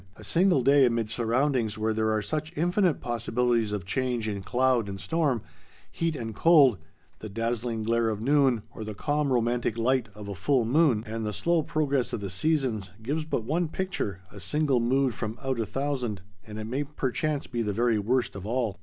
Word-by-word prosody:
A - - -13
single 175 -6 +3
day 140 0 +6
amid 115 -2 -1
surroundings 120 -1 0
where 110 0 0
there 110 0 +1
are 110 -1 0
such 155 +6 -4
infinite 175 0 +2
possibilities 120 -1 0
of 100 -4 -3
change 120 +2 -1
in 100 -2 -3
cloud 125 0 +1
and 95 0 -6
storm, 145 -7 0 0.5
heat 165 -1 -1
and 115 -4 -5
cold, 140 - +5 0.4
the 110 - -7
dazzling 115 +1 -2
glare 115 +1 +1
of 105 -2 -2
noon, 130 -2 +3
or 110 - -6
the 105 -1 -6
calm 145 +4 0
romantic 120 -1 +1
light 125 0 +1
of 105 -1 -9
a 100 - -4
full 125 +6 +1
moon, 130 -3 +3
and 110 +1 -4
the 105 - -2
slow 170 - +1
progress 145 -5 0
of - - -1
the 100 -2 -5
seasons, 125 - 0
gives 150 +6 -2
but 140 -7 -2
one 160 +8 0
picture, 155 - -3
a 100 - -10
single 145 +2 +1
mood 130 +2 +2
from 110 0 -5
out 130 -2 -1
a 110 - -1
thousand, 125 -7 -2 0.2
and 105 0 -8
it 110 - -4
may 130 +6 -1
perchance 145 +1 -2
be 120 - -3
the 105 -2 -1
very 115 +1 +2
worst 120 +4 0
of 100 - -7
all. 115 -1 -2
120 Hz, 200 wpm, -27 LUFS, 110-145 Hz, 0.5 s, day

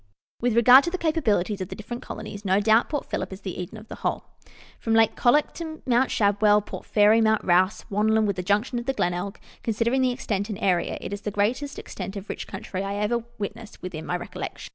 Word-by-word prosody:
With 240 -1 +1
regard 245 +3 +8
to - - 0
the 370 - -3
capabilities 225 - 0
of 185 - -4
the - - -6
different 240 +3 -7
colonies, 210 -1 -7
no 190 0 +3
doubt 220 +3 +4
Port 295 -2 -2
Phillip - - -3
is 190 +1 -8
the 185 -2 -5
Eden 180 +5 -7
of 215 +1 -12
the - - -8
whole. - - -2 0.6
From 225 -1 0
Lake 225 -1 +4
Colac 270 +5 +3
to 320 -2 -7
Mount 250 +1 +3
Shadwell, 205 0 +3
Port - - -9
Fairy, 215 +2 +5
Mount 220 -1 +2
Rouse, 185 +2 +2
Wannon, 215 +2 +2
with 200 -2 0
the - - -1
junction 210 +6 0
of 240 - -8
the 270 - +1
Glenelg, 180 -1 -2 0.2
considering 230 +4 +1
the 255 - +3
extent 210 -5 -2
tind 210 -4 -5
area, 180 -3 +1
it - - -5
is 200 - -5
the 210 - -3
greatest 230 +8 -1
extent 195 - -7
of 200 +1 -7
rich - - -5
country 190 -1 -5
I 195 0 -3
ever 215 +3 0
witnessed 215 +2 -7
within 165 -4 -6
my 180 - 0
recollection. - - -7
215 Hz, 225 wpm, -25 LUFS, 200-235 Hz, 0.6 s, regard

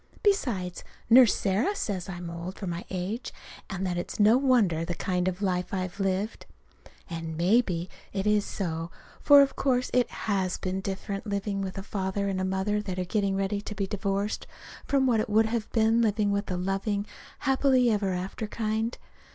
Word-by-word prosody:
Besides, 240 - 0 0.3
Nurse 240 -3 +8
Sarah 210 - +1
says 195 - -3
I 180 - -5
am 175 -1 -6
old 170 +3 -6
for 200 - -5
my 175 -1 -4
age, 195 +6 -3 0.4
and 190 -1 -3
that 175 -1 -1
it's 175 - -6
no 210 +3 +6
wonder, 240 - +3
the 175 +1 -3
kind 180 +1 -1
of 185 +2 -2
a - - +3
life 180 0 -1
I've 185 +1 -4
lived. 195 +3 -1 0.6
And 165 -2 -5
maybe 180 -1 +2 0.2
that 195 0 -2
is 210 -1 +3
so. 165 -5 -3 0.3
For 285 -1 +8
of 275 - -2
course 255 -2 +1
it 250 -2 +3
has 190 -4 -1
been 185 +1 -3
different, 195 +2 -4
living 200 0 -2
with 190 -1 -4
a 195 - -4
father 200 0 -2
and 185 -1 -1
mother 200 +2 0
that 190 -3 -5
are 185 - -1
getting 200 +1 0
ready 195 +1 -1
to 210 - -7
be 200 - -1
divorced 200 +1 -2 0.4
from 275 -1 +3
what 240 -4 +3
it 220 +2 -1
would 220 +1 +4
have 220 -1 -2
been 225 0 +3
living 210 -2 +2
with 200 0 -1
the 180 - -2
loving, 195 +2 -1 0.3
happy 265 -3 +3
ever 205 -3 +1
after 185 +4 -3
kind. 220 +2 -2
200 Hz, 190 wpm, -28 LUFS, 185-220 Hz, 0.6 s, Nurse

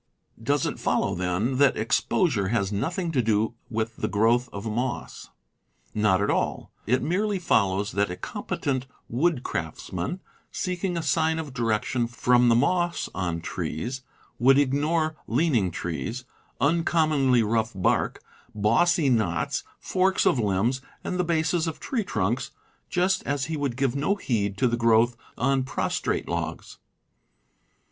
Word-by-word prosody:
Does 140 +5 +1
it - - -3
follow, 95 - +1
then, 90 +8 -1
that 140 -2 +4
exposure 115 - +1
has 100 -2 0
nothing 165 - -1
to 135 -5 +2
do 110 0 +1 0.2
with 115 0 -3
the - - -1
growth 115 +4 +2
of 100 +2 -7
moss? 120 +3 -3 0.6
Not 105 -2 +2
at - - +1
all. - - -1 0.2
It 130 +3 +2
merely 200 +5 0
follows 100 - +1
that 100 -1 +1
a 90 - -4
competent 130 +6 -3 0.2
woodcraftsman, 120 - -2 0.3
seeking 180 -1 -2
a 165 - -2
sign 160 0 +2
of 155 -4 -5
direction 115 0 0
from 120 +1 +3
the 115 - +5
moss 175 +7 +1
on 85 -3 -2
trees, 120 - -4 0.4
would 135 +3 +6
ignore 155 +3 +1
leaning 120 - +2
trees, 90 +9 -4 0.3
uncommonly 155 -5 +3
rough 110 +1 0
bark, 95 - 0 0.3
bossy 140 - +3
knots, 95 - +1
forks 190 +1 +1
of 130 - +3
limbs, 110 +5 +1 0.2
and 180 - -3
the - - +3
bases 165 0 +1
of 160 - -4
tree 250 -6 -2
trunks, 110 - -1 0.4
just 185 +1 +1
as 140 -1 0
he 160 - -3
would 140 -5 -2
give 135 -1 +1
no 150 +8 +1
heed 100 - -1
to 130 - +3
the 120 0 0
growth 115 +1 +4 0.2
on 135 +1 +2
prostrate 130 - -2
logs. - - -4
125 Hz, 140 wpm, -26 LUFS, 110-160 Hz, 0.6 s, would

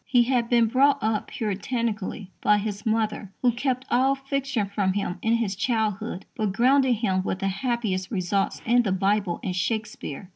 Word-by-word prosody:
He 245 -2 +4
had 240 -1 0
been 235 -2 +4
brought 270 +5 +4
up 215 -1 0
Puritanically 210 -1 -3
by 210 - +4
his 205 0 -4
mother, 215 -3 -1
who 245 - +5
kept 255 +1 -2
all 265 +3 +3
fiction 275 -4 -2
from 200 -1 0
him 195 -2 -2
in 225 - +2
his 220 -4 -1
childhood, 220 -2 -1
but 215 -6 -1
grounded 260 +3 +4
him 195 -4 0
with 185 - -2
the 195 - -2
happiest 210 -4 -2
results 195 -1 -1
in 240 +2 +4
the 210 -5 -1
Bible 195 -1 +1
and 185 -2 -2
Shakespeare. 210 -4 -3
220 Hz, 175 wpm, -25 LUFS, 195-245 Hz, -, who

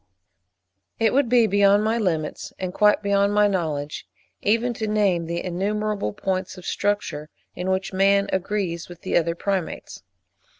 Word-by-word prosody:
It 225 -1 +2
would 270 -2 +2
be 240 -1 +5
beyond 200 0 +4
my 225 +2 +1
limits, 160 -7 -2
and 185 -1 -4
quite 210 +1 +3
beyond 200 0 +2
my 210 0 +5
knowledge, 150 - -3 0.3
even 230 +3 +1
to 220 -1 -4
name 195 -6 +1
the 170 +1 -3
innumerable 205 - -1
points 185 - -3
of 180 - -11
structure 200 -7 -2 0.3
in 180 +1 -3
which 190 +1 -1
man 200 +1 +3
agrees 190 -3 -2
with 175 -1 -12
the - - -2
other 170 0 +2
Primates. 190 -1 -3
195 Hz, 155 wpm, -23 LUFS, 175-210 Hz, 0.3 s, be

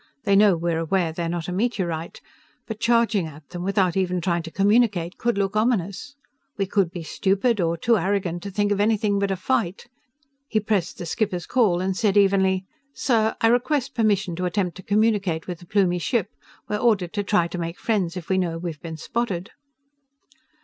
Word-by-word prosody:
They 200 - +3
know 200 -3 +5
we're 165 0 -1
aware 165 +1 0
they're 170 0 -3
not 170 -1 -3
a - - -3
meteorite. 180 -6 -2 0.4
But 220 -2 -6
charging 230 -6 +2
at 150 -1 -13
them 175 -1 -6
without 190 -2 +1
even 180 -1 0
trying 170 0 0
to 165 - -8
communicate 200 -2 +2
could 235 -3 0
look 195 0 0
ominous. 215 +3 -1 0.4
We 200 - +1
could 190 -2 +1
be 175 -1 -7
stupid, 200 +6 +1
or 170 0 0
too 230 +6 +2
arrogant 185 -2 -1
to 200 - -6
think 205 +1 0
of 205 - +1
anything 205 -1 +2
but 200 0 0
a 195 - 0
fight." 190 -1 -1 0.6
He 220 - +1
pressed 205 -4 -1
the 175 - -6
skipper's 180 -2 -2
call 205 -9 +2
and 190 0 -1
said 210 -1 +1
evenly: 190 -1 +3 0.3
"Sir, 230 -4 +1
I 225 - +5
request 265 +3 +1
permission 205 -6 +1
to 180 - -2
attempt 180 -1 -1
to - - -9
communicate 200 -5 +1
with 175 -2 -6
the 175 - -15
Plumie 185 -3 +2
ship. 220 0 0 0.4
We're 210 - -1
ordered 210 -6 +1
to 205 - 0
try 200 -4 +2
to 180 - -5
make 170 +1 -4
friends 190 -6 -1
if 170 - -7
we 190 -1 +1
know 170 -3 -1
we've 165 -3 -6
been 160 -1 -6
spotted." 190 0 -3
195 Hz, 195 wpm, -24 LUFS, 175-215 Hz, 0.6 s, know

